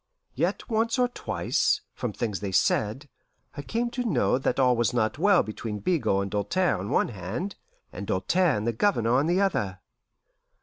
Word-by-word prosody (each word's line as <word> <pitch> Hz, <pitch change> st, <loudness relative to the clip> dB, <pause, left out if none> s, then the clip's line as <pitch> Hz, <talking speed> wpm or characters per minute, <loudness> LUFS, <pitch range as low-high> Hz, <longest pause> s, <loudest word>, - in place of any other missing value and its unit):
Yet -, -, -1 dB
once 230 Hz, +1 st, +1 dB
or 250 Hz, -1 st, +3 dB
twice, 425 Hz, -, 0 dB
from 125 Hz, -, -3 dB
things 105 Hz, -2 st, -3 dB
they 100 Hz, -1 st, -4 dB
said, 110 Hz, +8 st, +1 dB, 0.5 s
I 145 Hz, -, -5 dB
came 235 Hz, +10 st, -2 dB
to 245 Hz, 0 st, -2 dB
know 125 Hz, -, +1 dB
that 130 Hz, -, -1 dB
all 125 Hz, -2 st, +4 dB
was 120 Hz, 0 st, 0 dB
not 110 Hz, +4 st, 0 dB
well 200 Hz, 0 st, +5 dB
between 110 Hz, 0 st, -5 dB
Bigot 100 Hz, -, +1 dB
and 100 Hz, -, -6 dB
Doltaire 105 Hz, -, 0 dB
on 100 Hz, +3 st, -5 dB
one -, -, +2 dB
hand, 110 Hz, -, -5 dB, 0.4 s
and 100 Hz, +2 st, -6 dB
Doltaire 165 Hz, -, +2 dB
and 105 Hz, -, -3 dB
the 120 Hz, -, 0 dB
Governor 120 Hz, -, +1 dB
on 145 Hz, -, +1 dB
the 175 Hz, +2 st, +2 dB
other. 105 Hz, -, 0 dB
125 Hz, 180 wpm, -26 LUFS, -, 0.5 s, well